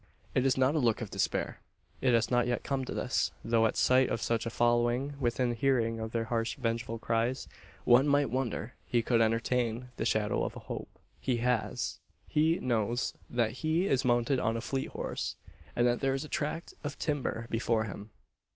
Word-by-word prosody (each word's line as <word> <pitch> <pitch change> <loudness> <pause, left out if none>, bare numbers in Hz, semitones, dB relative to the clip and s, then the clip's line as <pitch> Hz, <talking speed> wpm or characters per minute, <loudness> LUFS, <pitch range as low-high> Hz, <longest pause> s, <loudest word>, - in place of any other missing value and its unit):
It 130 +1 +3
is 135 - +2
not 130 +2 +3
a 160 - +2
look 115 -5 +2
of 105 -3 -5
despair. - - -1 0.4
It 125 -2 +4
has 115 +1 +1
not 120 -1 +3
yet 120 -1 -1
come 135 -2 -1
to - - -5
this; - - 0 0.2
though 115 -1 +4
at - - -3
sight 130 0 +4
of 115 - -1
such 115 -1 0
a - - 0
following 120 +4 +2
within 120 -1 +1
hearing 115 -2 +1
of 110 0 -4
their 115 -1 0
harsh 115 0 -1
vengeful 115 -2 -2
cries 115 +3 -1 0.4
one 125 +4 +6
might 145 -3 +3
wonder 125 -2 -2
he 120 -1 +1
could 115 0 +3
entertain 115 +1 0
the - - -1
shadow 105 -1 +1
of - - -3
a - - -6
hope. - - -6 0.3
He 125 -2 0
has. 120 -1 -1 0.3
He 160 +3 +3
knows 120 -1 0 0.2
that 120 -2 +1
he 160 +3 +2
is 135 -8 +2
mounted 120 +1 +2
on 115 -1 0
a - - -3
fleet 135 +2 -2
horse, - - -4 0.4
and 120 - +3
that 120 0 +2
there 135 -1 +1
is 135 +3 -3
a - - -11
tract 155 +3 -3
of 145 - -4
timber 140 -6 -2
before 115 -1 +1
him. 105 0 -7
120 Hz, 195 wpm, -31 LUFS, 115-130 Hz, 0.4 s, one